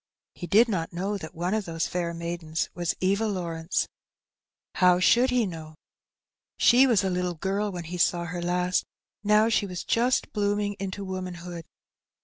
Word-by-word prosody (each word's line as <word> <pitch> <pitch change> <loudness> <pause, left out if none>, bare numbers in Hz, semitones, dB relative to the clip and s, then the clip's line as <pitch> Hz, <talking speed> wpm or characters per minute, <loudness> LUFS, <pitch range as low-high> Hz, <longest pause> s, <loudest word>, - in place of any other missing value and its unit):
He 175 - -7
did 225 +6 +5
not 175 -7 -2
know 195 +4 -2
that 160 0 -9
one 175 +4 -1
of 215 -2 -1
those 165 -1 -2
fair 175 -1 -2
maidens 170 -1 -3
was 175 -2 -2
Eva 200 +4 +2
Law 185 -5 -2
rence; 165 +1 -1 0.9
how 180 -1 +4
should 240 +7 +4
he 250 -2 +2
know? 160 -4 -7 0.8
She 255 +3 +6
was 220 -6 +3
a 190 - +1
little 180 -1 -1
girl 195 +5 -1
when 175 -2 -5
he 175 +2 -6
saw 175 0 +2
her 175 +1 -5
last, 180 +1 +1 0.4
now 210 +1 +4
she 210 -3 +1
was 180 -2 -5
just 245 +2 +1
blooming 205 -1 0
into 195 +1 -4
womanhood. 180 -2 -6
180 Hz, 170 wpm, -26 LUFS, 170-205 Hz, 0.9 s, She